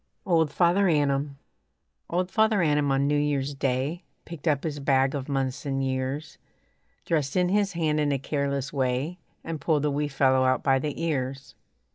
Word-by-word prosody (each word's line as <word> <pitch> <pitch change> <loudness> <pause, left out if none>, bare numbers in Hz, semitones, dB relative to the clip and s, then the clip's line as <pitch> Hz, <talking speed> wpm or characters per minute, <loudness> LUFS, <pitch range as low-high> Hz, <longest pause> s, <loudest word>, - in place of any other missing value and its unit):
OLD 165 -5 +3
FATHER 180 +5 +3
ANNUM 140 -3 +1 0.7
Old 180 +2 -1
Father 220 -4 +3
Annum 145 -2 +2
on 135 +1 +2
New 145 0 +2
Year's 145 -1 -1
Day 135 +6 -2 0.2
Picked 170 -1 -8
up 145 -3 +2
his 150 -3 -3
bag 135 -1 +2
of 140 -1 -4
months 135 -2 -2
and 135 -1 -1
years, 130 +4 -3 0.7
Thrust 150 -5 0
in 180 -1 +2
his 200 0 +1
hand 155 -3 0
in 145 -1 +1
a 140 - +1
careless 140 0 -2
way, 135 +6 -1 0.2
And 160 -3 -5
pulled 150 -1 +1
a 150 - +1
wee 145 +1 -1
fellow 130 -2 +2
out 130 0 +1
by 135 -1 +3
the 150 +1 -4
ears. 135 -4 -3
145 Hz, 175 wpm, -26 LUFS, 135-160 Hz, 0.7 s, OLD